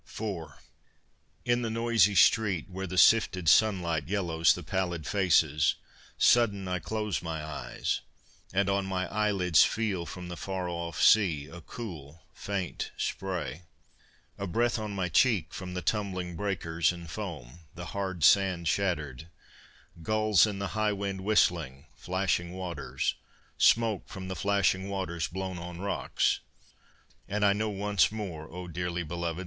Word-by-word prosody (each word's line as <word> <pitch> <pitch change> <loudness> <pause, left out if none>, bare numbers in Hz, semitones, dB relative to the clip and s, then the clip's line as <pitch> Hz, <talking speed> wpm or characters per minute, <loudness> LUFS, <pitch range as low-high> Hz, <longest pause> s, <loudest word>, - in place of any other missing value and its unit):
IV 100 -7 -5 1.0
In 120 0 +2
the 115 - -2
noisy 115 -2 +3
street, 95 -2 +4
Where 95 0 -5
the 95 - -5
sifted 90 -3 +4
sunlight 85 -4 +3
yellows 85 -5 +2
the 90 - -7
pallid 90 -2 -2
faces, 80 -6 +3 0.4
Sudden 100 -5 +3
I 90 0 -1
close 105 +2 -2
my 80 -2 -4
eyes, 70 -5 -3 0.5
and 95 +1 +1
on 100 0 0
my 95 -1 -1
eyelids 100 -6 +4
Feel 100 -6 -1
from 90 -1 -7
the 90 - -6
far 95 +1 -4
off 85 -1 -4
sea 85 -9 +4
a 85 +3 -11
cool 80 - -9
faint 95 -3 -4
spray, 90 -4 -3 0.8
A 100 - -3
breath 115 +5 +1
on 105 -2 -4
my 95 -2 -1
cheek, 90 - +2
From 90 -1 -6
the 90 - -3
tumbling 90 -2 -2
breakers 85 -4 0
and 85 -1 -9
foam, 80 - -7 0.2
the 90 0 -7
hard 95 -5 -3
sand 90 -1 +4
shattered, 80 -6 -1 0.7
Gulls 110 +2 +3
in 105 -2 -4
the 100 -1 -3
high 110 0 0
wind 100 -1 -4
whistling, 85 -9 +1
flashing 90 -1 -1
waters, 80 -9 -3 0.5
Smoke 115 -4 +3
from 95 -1 -7
the 95 - -3
flashing 100 0 +1
waters 85 -4 -2
blown 95 0 -5
on 85 0 -7
rocks; 100 +1 0 0.9
And 105 +1 0
I 100 - +5
know 110 +2 -1
once 105 0 +1
more, 90 -8 -6
O 90 +1 -7
dearly 90 0 -3
belovèd! 85 +1 -3
95 Hz, 145 wpm, -29 LUFS, 85-100 Hz, 1.0 s, I